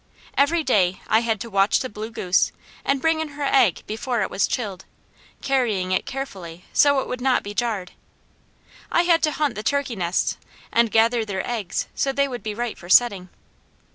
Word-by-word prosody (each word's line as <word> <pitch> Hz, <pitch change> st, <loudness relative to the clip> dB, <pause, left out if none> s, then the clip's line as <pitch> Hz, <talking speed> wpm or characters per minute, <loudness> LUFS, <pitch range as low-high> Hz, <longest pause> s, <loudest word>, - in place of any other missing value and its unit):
Every 315 Hz, +4 st, +3 dB
day 190 Hz, -9 st, +2 dB
I 220 Hz, -, +4 dB
had 225 Hz, -2 st, -1 dB
to 230 Hz, -, -6 dB
watch 195 Hz, +1 st, +3 dB
the 255 Hz, -, -2 dB
blue 215 Hz, -1 st, -7 dB
goose, 185 Hz, -5 st, +1 dB, 0.3 s
and 275 Hz, 0 st, +1 dB
bring 320 Hz, 0 st, +2 dB
in 315 Hz, -, -3 dB
her 290 Hz, -, -3 dB
egg 260 Hz, -9 st, +3 dB
before 225 Hz, +1 st, -2 dB
it -, -, -4 dB
was -, -, +1 dB
chilled, 200 Hz, -6 st, -4 dB, 0.6 s
carrying 225 Hz, -9 st, 0 dB
it 185 Hz, -, 0 dB
carefully 190 Hz, -10 st, -7 dB
so 285 Hz, -2 st, +4 dB
it -, -, -6 dB
would 250 Hz, 0 st, -4 dB
not 260 Hz, 0 st, +2 dB
be 205 Hz, -, -6 dB
jarred. 210 Hz, -5 st, -2 dB, 1.0 s
I 345 Hz, -, +3 dB
had 335 Hz, -2 st, +3 dB
to 310 Hz, -1 st, +2 dB
hunt 295 Hz, -3 st, 0 dB
the 210 Hz, -, -5 dB
turkey 280 Hz, +1 st, -1 dB
nests 175 Hz, -2 st, -1 dB, 0.3 s
and 235 Hz, 0 st, +3 dB
gather 230 Hz, +1 st, +3 dB
their 195 Hz, -3 st, -4 dB
eggs 220 Hz, -6 st, -2 dB
so 275 Hz, -, 0 dB
they 280 Hz, +1 st, +1 dB
would 245 Hz, -3 st, -6 dB
be 215 Hz, -2 st, -4 dB
right 240 Hz, 0 st, -4 dB
for 175 Hz, -, -12 dB
setting. 195 Hz, -4 st, +4 dB
230 Hz, 195 wpm, -23 LUFS, 200-270 Hz, 1.0 s, I